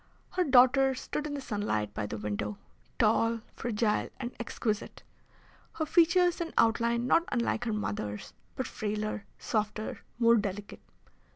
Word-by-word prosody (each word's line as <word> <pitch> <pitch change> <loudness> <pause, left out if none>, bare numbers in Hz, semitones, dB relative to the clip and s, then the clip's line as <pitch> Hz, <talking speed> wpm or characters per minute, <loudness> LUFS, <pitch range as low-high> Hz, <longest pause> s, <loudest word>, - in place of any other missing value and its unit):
Her 365 - +1
daughter 265 -1 +5
stood 300 +3 -4
in 290 - -4
the 280 - -4
sunlight 205 - -2
by 105 - -3
the 110 - -5
window, 105 0 -3 0.4
tall, 230 0 +3
fragile, 220 -2 0
and 245 -1 -4
exquisite, 220 -2 -3 0.7
her 315 - -2
features 345 +2 +4
and 330 -1 -3
outline 235 +1 +3
not 330 +6 +4
unlike 240 -1 0
her 230 - 0
mother's, 105 - -4 0.2
but 260 - -2
frailer, 215 -1 -3
softer, 215 0 -2 0.2
more 235 -1 +5
delicate. 205 -1 -4
230 Hz, 135 wpm, -30 LUFS, 210-265 Hz, 0.7 s, daughter